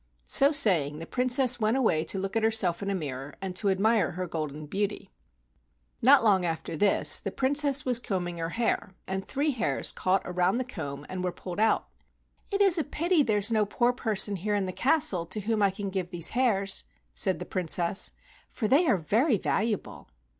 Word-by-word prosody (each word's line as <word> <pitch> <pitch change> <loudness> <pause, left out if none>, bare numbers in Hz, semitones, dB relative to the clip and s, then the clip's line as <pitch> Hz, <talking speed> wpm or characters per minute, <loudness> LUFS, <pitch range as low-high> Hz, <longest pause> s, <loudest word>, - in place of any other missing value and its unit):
So 275 +1 +5
saying, 175 - +2
the 165 - -7
Princess 250 +1 +2
went 220 +3 +1
away 170 -12 +1
to - - -1
look 195 +2 -4
at 225 - +1
herself 220 -6 +2
in 200 - -3
a 200 - -1
mirror 140 -4 -6
and 190 -2 -6
to 200 +2 0
admire 205 +1 +1
her 185 +2 -4
golden 155 -3 -6
beauty. 200 +6 -4 0.9
Not 265 +2 +6
long 195 -4 +3
after 165 -1 -4
this 200 +5 +2
the - - -5
Princess 285 +1 +1
was 250 -2 +3
combing 180 -7 -4
her 165 0 -3
hair, 230 0 -2 0.2
and 190 0 -4
three 285 +6 -1
hairs 250 - 0
caught 185 +1 0
around 180 +3 0
the 255 - -1
comb 145 - -7
and 185 -1 -5
were 180 - -1
pulled 180 +1 -8
out. 220 +1 +1 0.6
"It 400 0 0
is 380 -4 +5
a - - 0
pity 335 +3 0
there 220 -6 +1
is 205 +3 +4
no 215 -2 +2
poor 240 +4 0
person 210 -4 +1
here 205 +4 -2
in 200 -2 -1
the 185 - -4
castle 250 - +1
to 210 +4 -4
whom 220 +1 -1
I 200 - +4
can 195 +1 -6
give 185 -2 -3
these 170 -2 +2
hairs," 205 -6 +1 0.3
said 190 -2 +1
the 180 - -7
Princess, 180 +1 0 0.4
"for 215 - -3
they 295 +9 +3
are 200 - +3
very 220 - +1
valuable." 215 +2 -3
200 Hz, 200 wpm, -27 LUFS, 180-245 Hz, 0.9 s, Not